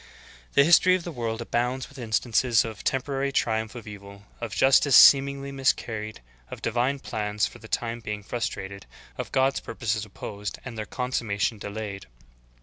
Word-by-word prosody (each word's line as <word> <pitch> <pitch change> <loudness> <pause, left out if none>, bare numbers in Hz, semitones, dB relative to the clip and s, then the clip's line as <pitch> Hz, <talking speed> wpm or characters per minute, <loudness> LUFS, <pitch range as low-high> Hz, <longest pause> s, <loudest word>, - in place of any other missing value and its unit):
12. - - -24
The 140 - +7
history 175 +3 +6
of 185 - -3
the 175 - -5
world 115 -4 -3
abounds 125 +3 -1
with - - -14
instances 115 +1 +2
of 110 -2 -7
the - - -10
temporary 135 +1 -1
triumph 110 -3 -1
of 120 - -8
evil, 100 -1 -11 0.2
of 115 -4 -5
justice 135 +1 +5
seemingly 140 0 +6
mis 135 -1 +3
carried, 110 - -7 0.3
of - - -8
divine 120 +4 0
plans 105 -4 -2
for 120 - -8
the 110 - -12
time 115 +1 -2
being 105 -2 -5
frustrated, 100 -3 -5 0.3
of - - -4
God's 135 +1 +2
purposes 110 -2 -3
opposed 105 0 -7
and 125 -3 -7
their 110 -1 -5
consummation 115 -4 -2
delayed. 100 - -6
115 Hz, 170 wpm, -26 LUFS, 105-130 Hz, 0.3 s, The